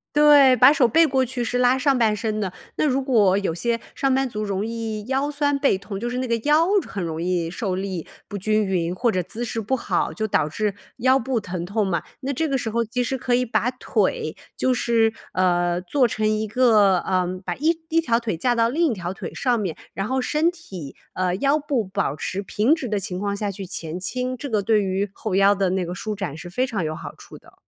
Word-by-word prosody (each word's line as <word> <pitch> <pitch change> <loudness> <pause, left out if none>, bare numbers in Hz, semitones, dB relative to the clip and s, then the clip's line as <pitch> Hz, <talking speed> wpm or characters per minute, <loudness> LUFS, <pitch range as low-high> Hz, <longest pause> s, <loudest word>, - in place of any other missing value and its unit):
对， 290 -3 +7
把 255 +5 +8
手 265 -5 +4
背 325 +7 +4
过 265 -1 +1
去 250 0 -3
是 245 +1 -1
拉 250 +1 +4
上 275 -1 +2
半 220 -3 +3
身 215 0 -2
的。 190 -3 -3 0.2
那 - - +1
如 270 -1 +1
果 215 -8 +3
有 195 - -1
些 235 +4 -1 0.2
上 270 -1 +1
班 270 0 +1
族 215 -2 -4
容 200 -1 -2
易 225 -2 -4
腰 270 +3 0
酸 285 -1 +1
背 275 -6 +3
痛 195 +1 -6
就 235 - -3
是 250 +1 -2
那 255 - -2
个 230 - +1
腰， 310 +3 +4 0.2
很 195 -4 -4
容 160 -1 -4
易 175 -1 -1
受 185 +1 -3
力 190 -3 -4 0.2
不 205 - -5
均 215 +2 +1
匀， 180 -3 -1
或 235 +5 +1
者 185 -3 -1
姿 220 +7 -6
势 230 -1 -3
不 225 +5 -1
好， 250 - -1
就 220 -1 -2
导 155 -7 +1
致 205 +5 -2 0.2
腰 260 +2 +4
部 255 -1 -1
疼 180 -3 -5
痛 205 +2 0
嘛。 170 -4 -1 0.2
那 275 0 -3
这 320 +4 -1
个 270 -3 0
时 225 - -3
候， 230 +1 0
其 245 +3 -1
实 265 +2 -2
可 245 0 -1
以 250 +1 +3
把 245 0 0
腿 450 - -1 0.2
就 260 - +1
是， 230 -2 +2 0.2
呃， 175 -1 +1
做 250 +7 +2
成 215 -1 0
一 215 0 0
个 210 -5 +4
呃， 185 0 0 0.2
把 - - -3
一 315 +4 +2 0.3
条 235 -8 +1
腿 215 -8 -3
架 245 +8 +1
到 230 -1 +2
另 315 +1 +1
一 - - 0
条 180 -4 -4
腿 - - -7
上 245 -4 +1
面， 185 -6 -3 0.2
然 195 +1 -2
后 260 +2 0
身 310 +6 +1
体 185 - -9 0.2
呃， 180 -1 0
腰 280 +5 +2
部 280 -7 -1
保 185 -6 -2
持 195 +6 -4
平 220 - +2
直 300 -7 -5
的 210 -1 -1
情 185 -1 -4
况 200 +1 -2
下 205 0 -2
去 195 0 -6
前 170 -2 -5
倾， 255 +6 -3
这 285 - -6
个 215 -5 0
对 215 0 +2
于 195 +1 -1
后 210 0 -5
腰 195 +1 +5
的 195 -2 +1
那 190 -1 0
个 175 +1 -5
舒 215 +3 -4
展， 180 -7 -5
是 175 +1 -9
非 255 +7 0
常 215 -8 -2
有 155 0 -3
好 - - -8
处 - - -13
的。 - - -20
220 Hz, 260 characters per minute, -23 LUFS, 190-255 Hz, 0.3 s, 把